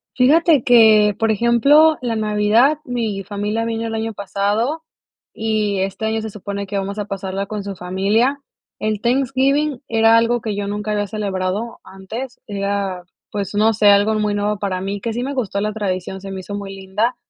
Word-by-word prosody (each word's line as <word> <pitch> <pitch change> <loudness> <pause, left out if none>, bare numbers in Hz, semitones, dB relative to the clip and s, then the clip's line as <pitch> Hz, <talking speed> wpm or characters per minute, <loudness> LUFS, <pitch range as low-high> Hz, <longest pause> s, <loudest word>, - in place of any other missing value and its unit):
Fíjate 295 +2 +4
que, 215 -4 +6
por 225 -1 +1
ejemplo, 275 +8 +4
la 240 -2 -2
Navidad, 220 +7 +2
mi 225 -7 -3
familia 205 +3 -2
vino 230 0 -2
el 225 - -4
año 225 0 -3
pasado 205 - -1 0.5
y 215 -3 -1
este 195 +3 -2
año 220 0 -1
se 220 - -5
supone 200 0 -6
que 200 - -3
vamos 200 +2 -3
a 205 - -2
pasarla 195 -1 -4
con 210 0 -5
su 200 0 -6
familia. 200 +10 0 0.4
El 215 -1 -2
Thanksgiving 270 +3 +1
era 225 0 +4
algo 235 +1 +2
que 215 -2 -3
yo 200 0 -3
nunca 210 +1 -3
había 205 -1 -1
celebrado 200 +2 -3
antes. 225 +7 -8
Era, 200 -3 -2 0.3
pues, 200 -1 -4
no 215 +2 +4
sé, 210 -1 +3
algo 205 +2 +4
muy 210 -1 0
nuevo 205 +1 -1
para 185 -2 -2
mí 200 +1 -3
que 230 +1 -3
sí 245 +2 -2
me 275 - -3
gustó 210 -6 -2
la 210 0 -1
tradición, 190 -3 -3
se 195 0 -7
me 190 - -5
hizo 200 +2 -7
muy 195 -1 -6
linda. 195 +5 -1
210 Hz, 185 wpm, -19 LUFS, 200-230 Hz, 0.5 s, que